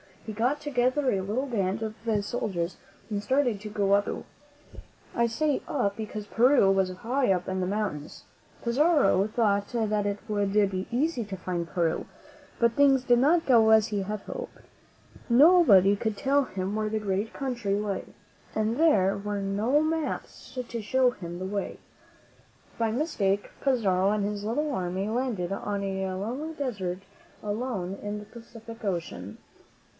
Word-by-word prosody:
He 220 - -5
got 245 +7 0
together 260 -1 +1
a 195 - 0
little 215 +8 -2
band 210 -4 -1
of 215 -1 -3 0.3
soldiers 185 -7 -3 0.3
and 205 -2 -2
started 255 -3 +1
to 210 - -6
go 200 -1 0
up 200 0 +4
to - - -3
Peru. - - -20 0.3
I 235 0 +2
say 295 +5 0
up, 200 -8 0
because 215 -1 -6
Peru 235 -1 +4
was 190 -1 +2
high 240 +5 0
up 180 -1 0
among 190 0 -2
the 180 - -1
mountains. 195 -7 -3 0.4
Pizarro 255 - +3
thought 205 -3 +1
that 215 -3 0
it 200 0 -1
would 205 -2 0 0.2
be 185 0 -3
easy 255 +1 0
to 195 -1 -6
find 175 -2 -3
Peru; 165 -2 -1 0.5
but 235 -1 +3
things 270 -1 +4
did 245 -1 +4
not 325 +6 +3
go 230 -4 +5
as 220 -1 +6
he 205 -3 -2
had 210 +1 -4
hoped. - - -7 0.7
Nobody 235 - +6
could 215 0 -2
tell 280 0 +2
him 190 -2 -4
where 215 0 -1
the 220 0 -1
great 205 +1 -2
country 240 -7 -2
lay, 205 -2 -2 0.5
and 220 +2 0
there 205 - +4
were 205 0 -3
no 210 +9 +1
maps 320 0 -3
to 235 -1 -4
show 255 +4 +2
him 175 -8 -7
the 185 - -5
way. 200 +1 -3 1.0
By 225 -1 +1
mis 300 +8 -2
take, 200 0 +1
Pizarro 200 -8 +2
and 210 -1 0
his 205 0 -3
little 290 +7 -1
army 185 0 -2
landed 225 -7 -2
on 200 0 -3
a 190 -1 -2
lonely 250 +12 -4
desert 195 -11 -3 0.4
island 205 -3 -3
in 205 0 -4
the 210 - -8
Pacific 230 0 -12
Ocean. 165 - -4
215 Hz, 165 wpm, -27 LUFS, 195-250 Hz, 1.0 s, as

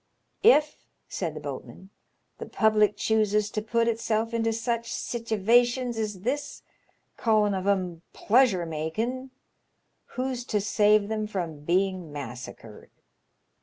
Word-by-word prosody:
If/* 305 -9 +4 0.2
said 165 -4 -4
the - - -5
boatman, 145 +5 -8 0.5
"the - - -6
public 215 -2 +3
chooses 210 -1 +1
to 215 - -2
put 230 +2 0
itself 230 0 -1
into 225 0 +1
sich 230 +1 -2
sittivations 240 +2 +1
as 210 -4 -3
this, 270 +7 -3 0.6
callin' 215 -3 +3
of 190 0 -3
*em 180 -4 0
pleasure 215 -6 +3
makin', 220 +12 -3 0.9
who's 255 -1 -2
to 210 - 0
save 210 0 +3
them 215 0 -2
from 175 -7 -4
being 185 -1 0
massacred 125 -4 -9
215 Hz, 120 wpm, -27 LUFS, 185-230 Hz, 0.9 s, If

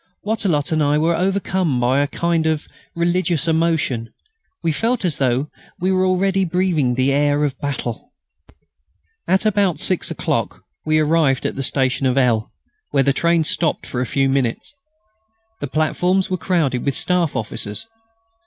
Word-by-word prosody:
Wattrelot 190 -8 0
and 155 -1 +1
I 145 0 +2
were 165 +2 +2
overcome 185 -6 0
by 125 +3 +2
a 145 - +2
kind 165 +1 0
of 155 -1 -1 0.3
religious 170 -1 0
emotion; 160 -8 0 0.5
we 165 - +2
felt 225 +6 -1
as 170 - 0
though 130 +2 0 0.3
we 185 +1 +1
were 185 0 +2
already 190 +1 +1
breathing 170 -8 +1
the 130 +2 +2
air 145 +1 +2
of 140 -2 -1
battle. 140 - -4 1.2
At 190 +3 +2
about 200 -7 +2
six 185 +2 0
o'clock - - -2 0.2
we 155 0 +3
arrived 155 -3 +2
at - - -2
the 135 - -3
station 130 0 0
of 130 +1 0
L., 120 -5 +2 0.4
where 140 -2 +2
the 140 +1 +2
train 170 +2 +2
stopped 160 +1 -1
for 125 - -3
a 125 - -2
few 135 -1 +1
minutes. 135 - -1 0.9
The 145 - -3
platforms 180 +6 0
were - - +2
crowded 160 -9 0
with 140 -2 -1
Staff 180 -4 +1
officers. 105 - -4
155 Hz, 160 wpm, -20 LUFS, 135-180 Hz, 1.2 s, we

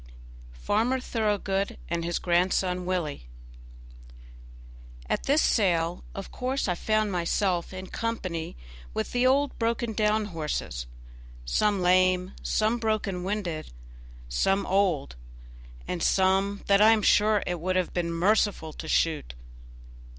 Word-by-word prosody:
48 - - -18
Farmer 235 +5 +2
Thoroughgood 205 -5 -1
and 170 0 -2
His 170 0 -1
Grandson 180 +1 +1
Willie 160 - -2 1.8
At - - -1
this 290 +3 +3
sale, 175 -5 +1
of 195 - -7
course 260 0 -2
I 180 - +1
found 215 +3 0
myself 175 0 0
in 185 0 -7
company 185 - -4 0.4
with 110 - -2
the 245 +1 +2
old 280 +2 +1
broken 230 0 -1
down 215 0 +1
horses 145 - -3 0.6
some 200 - +1
lame, 185 +1 +3
some 220 +2 +1
broken 215 -5 -1
winded, 185 - -3 0.6
some 195 - +1
old, 180 - 0 0.7
and 175 - -3
some 195 +2 +2
that 200 0 +4
I 220 +1 +8
am 215 -2 0
sure 210 0 +4
it 175 -1 -2
would 185 +3 -1
have 185 -1 0
been 170 -1 -1
merciful 180 -2 +1
to 160 - -8
shoot. 155 - 0
190 Hz, 130 wpm, -27 LUFS, 170-215 Hz, 1.8 s, I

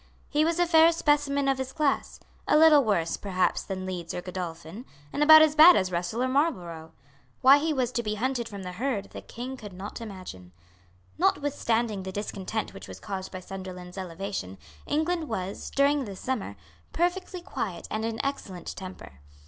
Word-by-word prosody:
He 300 0 +2
was 330 +1 +1
a 350 - +3
fair 330 -1 +6
specimen 290 -3 +1
of 270 -1 +1
his 265 0 -3
class, 295 -2 -1 0.3
a - - +5
little 305 -2 +7
worse, 175 -7 0
perhaps, 185 -2 0
than 185 -1 -5
Leeds 180 -3 -5
or 180 - -3
Godolphin, 175 +2 -6 0.3
and - - -2
about 315 +1 +9
as 310 -1 +3
bad 320 +3 +9
as 185 -1 +1
Russell 175 +8 -2
or - - +1
Marlborough. 180 - -1 0.5
Why 270 +2 +8
he 320 +2 0
was 255 -4 0
to 240 - -1
be 215 -2 -2
hunted 245 +1 -2
from 200 -2 -8
the 180 - -5
herd 215 +1 -3
the - - -8
King 255 +3 -7
could 210 -5 -10
not 195 +5 -7
imagine. 185 - -9 0.7
Notwithstanding 235 -7 +1
the 190 0 -6
discontent 205 +1 -4
which - - -10
was - - -10
caused 190 -2 -6
by 185 - -7
Sunderland's 185 -1 -8
elevation, 185 - -5 0.3
England 315 +1 0
was, 195 -3 -4
during 280 0 +2
this 195 -3 -8
summer, 230 - -3 0.4
perfectly 355 +2 -1
quiet 200 - -5
and 215 0 -2
in 225 0 -3
excellent 195 -10 -5
temper. 185 - -10
220 Hz, 180 wpm, -27 LUFS, 185-285 Hz, 0.7 s, about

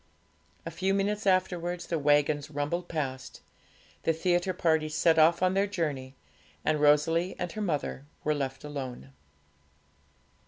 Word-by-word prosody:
A 165 - -4
few 190 +4 0
minutes 205 +1 -1
afterwards 180 -2 0
the 165 - -2
waggons 145 0 +2
rumbled 150 +4 -2
past, 130 -5 -4 0.6
the 165 - +1
theatre 175 +3 +1
party 160 -3 +1
set 160 +2 +3
off 170 +3 +5
on 185 0 +3
their 195 +1 +2
journey, 145 -9 -3 0.5
and 155 -1 +1
Rosalie 165 +4 +3
and 175 - -3
her 215 - -5
mother 145 -6 -2 0.2
were 150 - +1
left 135 -2 -4
alone. 130 - -6
160 Hz, 140 wpm, -29 LUFS, 145-180 Hz, 0.6 s, off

